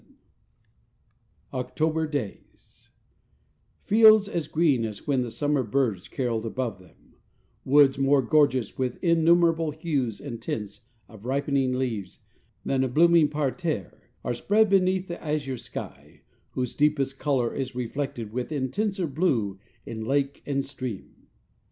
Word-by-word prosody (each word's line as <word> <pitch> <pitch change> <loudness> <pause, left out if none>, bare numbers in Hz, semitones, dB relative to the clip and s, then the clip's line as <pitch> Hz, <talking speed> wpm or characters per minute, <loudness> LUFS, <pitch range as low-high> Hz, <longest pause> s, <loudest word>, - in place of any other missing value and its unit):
XXXV - - -27 1.5
OCTOBER 155 +5 -1
DAYS 145 -9 -7 0.9
Fields 215 -1 +6
as 170 -5 -3
green 155 -7 +2
as 105 -3 -6
when 135 -3 +1
the 120 - -3
summer 145 +3 0
birds 110 -5 -1
caroled 120 -4 -2
above 115 -3 -3
them, 90 -2 -22 0.5
woods 135 -1 +5
more 135 0 +3
gorgeous 130 -4 +2
with 130 -2 -1
innumerable 165 -1 +3
hues 145 - -2
and 120 -5 -7
tints 105 -3 -5 0.3
of 110 -2 -15
ripening 135 0 0
leaves 115 -8 -3 0.4
than 135 -1 +1
a - - +1
blooming 165 +3 +5
parterre, 150 - -3
are - - -1
spread 205 - +2
beneath 190 -1 +2
the 170 - -7
azure 150 -4 -2
sky, 120 - -9 0.3
whose 125 -2 -2
deepest 140 -3 +1
color 130 -5 0
is 130 -2 -4
reflected 125 -2 -4
with 125 +4 -3
intenser 185 - -1
blue 130 - 0 0.3
in 110 -1 -6
lake 140 +3 -1
and 140 -1 -1
stream. 130 -7 -8
135 Hz, 130 wpm, -26 LUFS, 120-155 Hz, 1.5 s, Fields